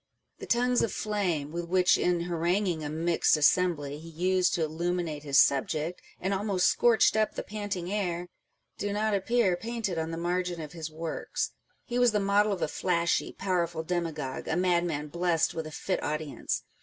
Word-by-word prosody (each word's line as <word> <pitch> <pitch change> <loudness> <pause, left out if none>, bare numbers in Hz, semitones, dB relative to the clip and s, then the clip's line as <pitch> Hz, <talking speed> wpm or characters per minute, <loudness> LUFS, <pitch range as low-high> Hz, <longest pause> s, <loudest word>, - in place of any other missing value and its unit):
The - - -8
tongues 245 +1 +2
of 225 - 0
flame, 180 -9 -1
with 170 +1 -3
which, 180 0 +4
in 175 -1 +1
haranguing 175 0 0
a 145 - -3
mixed 165 +1 +2
assembly, 150 -2 +2
he 165 +1 -10
used 180 +3 +1
to 170 - 0
illuminate 165 -1 -2
his 140 -2 +1
subject, 155 +5 +2 0.2
and 190 +2 -1
almost 195 -2 +1
scorched 235 -3 +4
up 215 0 +1
the - - -3
panting 205 -3 -4
air, 180 -4 -2 0.5
do 205 0 -2
not 215 +1 0
appear 200 -1 +2
painted 220 -4 -3
on 160 0 -2
the 165 - -4
margin 175 0 -1
of 155 -2 -7
his 160 -2 -5
works. 160 +1 -3 0.3
He 245 0 -2
was 245 -2 +4
the 210 - +2
model 205 +1 +3
of 195 - -1
a - - +1
flashy, 170 +1 0
powerful 170 -4 -1
demagogueâ€" 160 -6 -3
a - - 0
madman 170 -4 +1
blest 170 0 +1
with 160 -1 -4
a - - -8
fit 185 +4 -2
audience. 155 -1 -3
175 Hz, 180 wpm, -28 LUFS, 160-195 Hz, 0.5 s, which